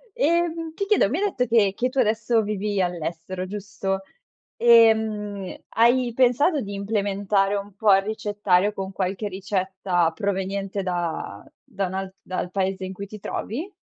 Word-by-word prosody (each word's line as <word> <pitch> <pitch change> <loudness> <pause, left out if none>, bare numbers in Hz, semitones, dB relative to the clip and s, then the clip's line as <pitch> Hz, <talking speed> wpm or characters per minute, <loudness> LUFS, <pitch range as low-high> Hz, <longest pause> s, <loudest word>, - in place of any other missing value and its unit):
Ehm, 330 +1 0
ti 400 - -2
chiedo, 405 - +3
mi 295 - -1
hai 400 - 0
detto 250 - 0
che 215 -4 +3
che 250 +1 0
tu 270 - -10
adesso 225 -1 +2
vivi 205 -1 -2
all'estero, 175 +1 -3
giusto? 195 -1 -3 0.6
Ehm, 220 -4 +3
hai 240 +1 +3
pensato 265 +5 +3
di 200 0 -6
implementare 200 -1 0
un 200 0 -5
po' 210 -1 +4
il 195 - +2
ricettario 205 -2 +1
con 195 -1 -5
qualche 195 +2 -2
ricetta 190 -3 -1
proveniente 195 0 -2
da 170 - -3 0.2
da 195 -1 -3
un 185 - -7
alt 190 0 -4
dal 180 -1 -4
paese 190 -1 -1
in 190 - -6
cui 200 +1 -7
ti 210 +1 -10
trovi? 310 - -5
200 Hz, 155 wpm, -24 LUFS, 190-225 Hz, 0.6 s, po